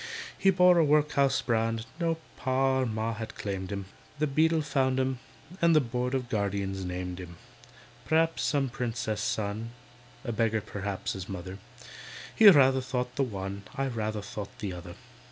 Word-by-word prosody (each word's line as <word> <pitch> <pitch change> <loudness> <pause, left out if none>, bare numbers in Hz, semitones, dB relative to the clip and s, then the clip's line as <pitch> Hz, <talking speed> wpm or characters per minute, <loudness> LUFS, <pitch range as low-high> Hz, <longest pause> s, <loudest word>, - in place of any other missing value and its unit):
He 195 - +3
bore 180 -1 +6
a - - +6
workhouse 145 -2 +3
brand; 115 -1 0
No 165 -1 +1 0.2
Pa 130 0 +1
or 130 - +1
Ma 110 +1 -2
had 110 0 -7
claimed 95 -1 -4
him, 100 -1 -4 0.3
The 150 - +1
Beadle 155 +2 +2
found 130 -3 +1
him, 130 -1 0 0.4
and 170 -1 +5
The - - +7
Board 125 0 -2
of 130 -2 -2
Guardians 100 -3 -2
named 90 0 -4
him. 85 -2 -9 0.7
P'r'aps 160 +1 +2
some 140 -3 +1
Princess's 115 -3 -3
son— 110 +2 -2 0.5
A 120 - -3
beggar 110 -1 +1
p'r'aps 100 -1 -4
his 95 -1 -7
mother. 95 0 -6 0.8
He 220 -2 +10
rather 135 -6 +6
thought 125 -1 -3
the - - 0
one, 100 -5 -3
I 135 - 0
rather 110 -3 -3
think 100 0 -7
the 100 -3 -4
other. 85 0 -9
115 Hz, 165 wpm, -29 LUFS, 100-135 Hz, 0.8 s, He